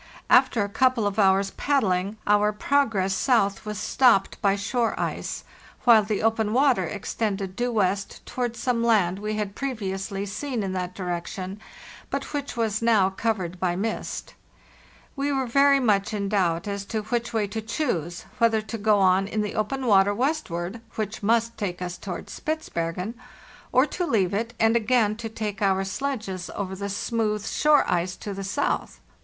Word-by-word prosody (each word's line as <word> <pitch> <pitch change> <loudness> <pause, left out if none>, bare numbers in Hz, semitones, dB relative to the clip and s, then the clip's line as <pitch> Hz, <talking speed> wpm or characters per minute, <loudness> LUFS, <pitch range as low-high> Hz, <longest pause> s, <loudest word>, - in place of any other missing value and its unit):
After 225 - +5
a - - -2
couple 255 0 +2
of 205 +1 -1
hours' 195 0 +4
paddling 205 -7 0
our 210 0 +4
progress 210 -5 +1
south 200 -1 +1
was 210 0 -3
stopped 235 -3 +3
by 200 -1 +3
shore 225 +3 -1
ice, - - -3 0.4
while 230 -3 +7
the 210 0 -2
open 220 -1 +1
water 255 -7 +3
extended 195 0 -3
due 245 +2 -1
west 200 -2 -1
towards 240 -2 -3
some 240 -2 0
land 195 -6 +3
we 215 +1 -3
had 210 -2 -3
previously 200 -6 -3
seen 225 +3 -3
in 190 -1 -3
that 180 0 -3
direction, 185 +2 -4 0.5
but - - -4
which 285 -3 -4
was 220 -2 0
now 215 -5 +4
covered 190 -4 -2
by 175 -1 0
mist. 220 +4 -4 0.8
We 280 0 -1
were 270 -1 0
very 275 +3 +4
much 215 -4 +1
in 200 -1 -2
doubt 180 -4 +1
as 200 -1 -3
to 215 +1 -3
which 235 +2 -2
way 220 -3 +1
to 220 +2 -4
choose, 195 - -2
whether 225 -2 +3
to 225 +1 -5
go 210 0 +3
on 190 0 +3
in 215 +1 -1
the 210 - -4
open 255 +5 -2
water 205 -2 +4
westward—which 225 - -3
must 230 +2 +1
take 180 -4 -3
us 180 -1 -4
towards - - -6
Spitzbergen— 185 - -3 0.6
or 255 +2 +5
to 355 +3 -3
leave 195 - +1
it 230 +4 -2
and 225 +1 +4
again 225 -2 +2
take 215 -3 -5
to - - -2
our 195 0 +2
sledges 195 -4 -4
over 190 -1 -3
the 200 +1 -4
504 - - -3
FARTHEST 200 - -4
NORTH 215 -2 +1
smooth - - -5
shore 300 -1 +4
ice 180 +1 0
to 205 - -6
the 195 0 -5
south. 205 +9 -2
210 Hz, 175 wpm, -25 LUFS, 195-235 Hz, 0.8 s, while